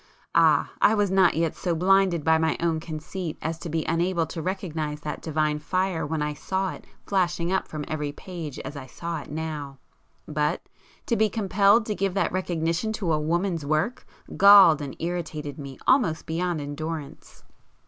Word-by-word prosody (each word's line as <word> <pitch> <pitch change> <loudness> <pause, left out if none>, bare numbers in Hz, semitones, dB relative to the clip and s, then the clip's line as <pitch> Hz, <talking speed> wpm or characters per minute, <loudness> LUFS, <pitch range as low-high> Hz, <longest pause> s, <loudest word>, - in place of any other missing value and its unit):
—ah, - - +4
I 220 - +5
was 205 -3 +1
not 190 -3 +4
yet 165 0 0
so 175 -2 -1
blinded 185 -1 +3
by 160 +1 +4
my 160 0 +1
own 165 -1 0
conceit 160 +2 -6
as 160 +1 -4
to 170 - -6
be 160 0 -1
unable 170 +1 +1
to 160 +1 -6
recognize 160 -5 -3
that 150 0 -5
divine 155 -1 0
fire 175 0 -1
when 155 0 -1
I 150 0 -2
saw 190 +5 -2
it - - -11 0.2
flashing 175 -3 0
up 190 - 0
from 150 -2 -5
every 150 -2 -3
page 160 -3 -7
as 140 +3 -7
I 135 -2 -8
saw 170 +3 -5
it - - -13
now; 150 -3 -5 0.5
but, 150 0 -1 0.4
to 235 - +1
be 220 -1 +3
compelled 205 +1 +3
to 215 - -1
give 195 -1 -1
that 200 - +1
recognition 175 +2 -1
to 185 -7 -1
a 155 - +1
woman's 170 +2 -1
work, 155 - -1 0.3
galled 195 -6 +8
and 140 -2 -6
irritated 160 -4 -4
me 135 -2 -8
almost 245 - +3
beyond 170 0 -1
endurance. 145 +1 -7
165 Hz, 180 wpm, -25 LUFS, 155-185 Hz, 0.5 s, galled